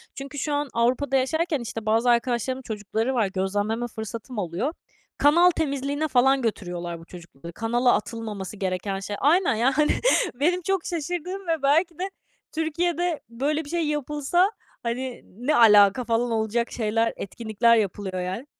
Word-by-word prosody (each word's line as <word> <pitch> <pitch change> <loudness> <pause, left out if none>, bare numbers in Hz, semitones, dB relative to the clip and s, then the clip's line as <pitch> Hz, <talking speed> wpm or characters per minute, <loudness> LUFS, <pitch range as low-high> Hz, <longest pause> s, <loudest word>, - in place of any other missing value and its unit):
Çünkü 275 +1 -7
şu 295 - -2
an 290 -1 -1
Avrupa'da 250 +4 +1
yaşarken, 305 +3 +1
işte, 225 -2 -6
bazı 225 +3 +2
arkadaşlarımın 240 +2 +1
çocukları 220 +2 -2
var, 230 -5 +2
gözlemleme 205 +5 -1
fırsatım 225 +2 -7
oluyor. 200 - -2 0.4
Kanal 340 +5 +6
temizliğine 285 -1 -1
falan 265 0 +3
götürüyorlar 175 -6 -3
bu 165 - -14
çocukları, 170 -2 -11
kanala 240 +5 +2
atılmaması 210 -3 -4
gereken 195 +1 -2
şey. 205 +1 -5
Aynen, 325 - +3
yani 245 +5 +3 0.6
benim 345 +8 +1
çok 385 0 -1
şaşırdığım 355 +3 -4
ve 325 -3 0
belki 325 +4 +2
de 380 +1 -2 0.4
Türkiye'de 335 +1 -1
böyle 290 +6 -1
bir 285 - -10
şey 335 -2 0
yapılsa, 295 +6 +1 0.3
hani, 245 +2 -3
ne 250 +10 -2
alaka 210 0 +6
falan 235 0 0
olacak 225 +1 0
şeyler, 225 0 0
etkinlikler 220 +2 +1
yapılıyor, 195 -3 -1
yani. 190 +9 -4
245 Hz, 145 wpm, -25 LUFS, 215-295 Hz, 0.6 s, Kanal